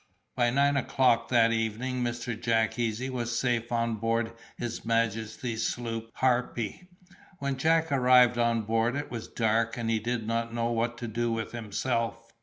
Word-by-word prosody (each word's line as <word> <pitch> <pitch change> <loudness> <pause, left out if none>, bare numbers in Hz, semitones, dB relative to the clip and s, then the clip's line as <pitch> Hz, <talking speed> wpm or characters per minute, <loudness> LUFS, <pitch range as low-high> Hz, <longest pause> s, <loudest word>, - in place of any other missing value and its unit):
By 120 -2 +3
nine 140 +3 +3
o'clock 125 -3 +2
that 115 -2 +4
evening 115 +3 -1
Mr. 120 0 -3
Jack 115 +1 0
Easy 115 +2 -1
was 120 -2 -2
safe 120 -2 0
on 115 -1 0
board 115 +1 0 0.2
his 120 -1 -4
majesty's 115 +1 -1
sloop 115 -2 -4
Harpy. 125 - 0 0.5
When 140 -4 -2
Jack 160 +3 +2
arrived 125 -2 +5
on 115 -1 +2
board 115 +3 +1
it 145 +1 -4
was 115 -2 -5
dark, 115 0 0
and 115 -1 -1
he 110 - +2
did 115 0 -2
not 115 +1 -2
know 115 0 0
what 115 +1 -1
to 120 - -5
do 115 +1 -1
with 110 -1 -3
himself. 115 0 -2
115 Hz, 165 wpm, -28 LUFS, 115-125 Hz, 0.5 s, arrived